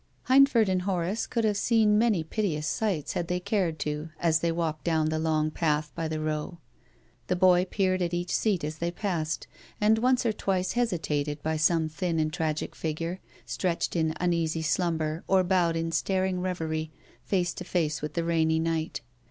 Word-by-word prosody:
Hindford 260 Hz, -4 st, +6 dB
and 185 Hz, -1 st, +1 dB
Horace 185 Hz, +2 st, -1 dB
could 230 Hz, -, -1 dB
have 210 Hz, -2 st, +2 dB
seen 220 Hz, -1 st, +3 dB
many 215 Hz, -8 st, +2 dB
piteous 160 Hz, -3 st, -2 dB
sights 170 Hz, -1 st, -1 dB
had 170 Hz, -, -2 dB
they 180 Hz, +1 st, -1 dB
cared 185 Hz, -4 st, 0 dB
to 150 Hz, +1 st, -3 dB
as 160 Hz, -2 st, +3 dB
they 170 Hz, 0 st, 0 dB
walked 165 Hz, -2 st, -2 dB
down 160 Hz, -2 st, +1 dB
the 155 Hz, 0 st, -1 dB
long 155 Hz, -1 st, +1 dB
path 150 Hz, -2 st, 0 dB
by 165 Hz, +1 st, -3 dB
the 155 Hz, 0 st, -3 dB
Row. 155 Hz, +3 st, -3 dB, 0.7 s
The 180 Hz, -, +1 dB
boy 180 Hz, 0 st, +5 dB
peered 185 Hz, -1 st, 0 dB
at 175 Hz, -1 st, 0 dB
each 175 Hz, 0 st, -2 dB
seat 200 Hz, -7 st, +1 dB
as 155 Hz, +1 st, -4 dB
they 170 Hz, -, 0 dB
passed, 170 Hz, -5 st, -2 dB, 0.3 s
and 215 Hz, +1 st, +4 dB
once 250 Hz, +1 st, +2 dB
or 225 Hz, -, +2 dB
twice 190 Hz, -3 st, -1 dB
hesitated 150 Hz, -10 st, -1 dB
by 160 Hz, 0 st, 0 dB
some 160 Hz, 0 st, +2 dB
thin 165 Hz, +1 st, -2 dB
and 155 Hz, 0 st, 0 dB
tragic 160 Hz, -3 st, -2 dB
figure, 165 Hz, +3 st, -3 dB, 0.3 s
stretched 180 Hz, -2 st, -1 dB
in 160 Hz, -1 st, +1 dB
uneasy 165 Hz, -2 st, 0 dB
slumber 160 Hz, -1 st, 0 dB
or 190 Hz, -1 st, +4 dB
bowed 175 Hz, -2 st, +2 dB
in 165 Hz, 0 st, -1 dB
staring 185 Hz, +2 st, 0 dB
reverie 160 Hz, -4 st, -2 dB, 0.3 s
face 180 Hz, -3 st, 0 dB
to -, -, -7 dB
face 155 Hz, -5 st, -1 dB
with 150 Hz, 0 st, -5 dB
the 170 Hz, -, 0 dB
rainy 160 Hz, -1 st, +2 dB
night. 160 Hz, 0 st, -1 dB
170 Hz, 185 wpm, -27 LUFS, 155-185 Hz, 0.7 s, Hindford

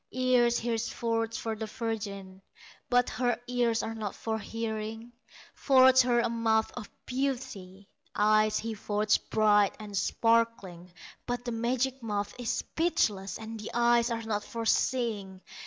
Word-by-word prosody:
Ears 250 Hz, -2 st, +3 dB
he 235 Hz, 0 st, -1 dB
forges 230 Hz, 0 st, -2 dB
for 225 Hz, -1 st, -3 dB
the 220 Hz, 0 st, -5 dB
virgin, 200 Hz, -5 st, -5 dB, 0.5 s
But 245 Hz, 0 st, +3 dB
her 245 Hz, -1 st, 0 dB
ears 240 Hz, -2 st, 0 dB
are 225 Hz, -, -3 dB
not 215 Hz, -3 st, -5 dB
for 220 Hz, -1 st, -3 dB
hearing; 225 Hz, +1 st, -5 dB, 0.4 s
Forges 260 Hz, -1 st, +6 dB
her 240 Hz, -1 st, +2 dB
a -, -, +1 dB
mouth 225 Hz, -1 st, +1 dB
of 230 Hz, -4 st, -7 dB, 0.2 s
beauty, 240 Hz, -8 st, -4 dB, 0.3 s
Eyes 215 Hz, +1 st, +3 dB
he 225 Hz, 0 st, -3 dB
forges 210 Hz, 0 st, +1 dB
bright 210 Hz, -2 st, +3 dB
and 210 Hz, -1 st, -8 dB
sparkling; 215 Hz, -5 st, 0 dB, 0.4 s
But 245 Hz, 0 st, -3 dB
the 240 Hz, -, -2 dB
magic 250 Hz, +3 st, -1 dB
mouth 205 Hz, -2 st, -3 dB
is 240 Hz, -2 st, -3 dB
speechless, 205 Hz, -, 0 dB
And 220 Hz, 0 st, -8 dB
the 215 Hz, -, -6 dB
eyes 240 Hz, 0 st, +3 dB
are 230 Hz, -1 st, -3 dB
not 210 Hz, -2 st, -2 dB
for 230 Hz, +1 st, -5 dB
seeing. 215 Hz, -7 st, 0 dB
225 Hz, 145 wpm, -29 LUFS, 210-240 Hz, 0.5 s, Forges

